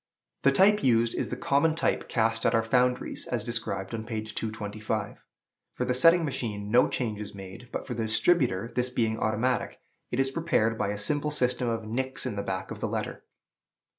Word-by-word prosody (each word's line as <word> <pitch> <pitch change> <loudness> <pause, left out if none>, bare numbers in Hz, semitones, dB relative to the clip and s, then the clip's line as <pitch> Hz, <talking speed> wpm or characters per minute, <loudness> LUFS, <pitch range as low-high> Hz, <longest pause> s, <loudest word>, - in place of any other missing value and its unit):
The 140 - +5
type 205 +8 +5
used 115 -4 +3
is - - -2
the 125 - -4
common 145 +5 +2
type 165 - 0
cast 115 -1 +1
at 115 - +2
our 115 - +3
foundries, 125 +2 0
as 120 -4 -2
described 115 -4 -3
on 110 -1 -3
page 110 -1 -5
225. 110 0 -3 0.6
For - - -1
the 125 - +1
setting 165 +6 +5
machine 110 -7 -3
no 120 +2 +6
change 110 -4 -2
is 105 -1 -7
made, 95 +5 -10
but - - -4
for - - -4
the 115 -1 -2
distributer, 115 - +2
this 125 0 0
being 115 -2 0
automatic, 115 +3 0 0.3
it 120 - -2
is 135 0 +2
prepared 135 -8 +1
by 110 - -1
a 105 - -2
simple 145 +8 0
system 125 -4 0
of 115 -1 -2
nicks 130 +5 -3
in 125 -5 -3
the 100 - -2
back 95 -1 -4
of - - -6
the - - -1
letter. - - -4
115 Hz, 195 wpm, -28 LUFS, 110-130 Hz, 0.6 s, no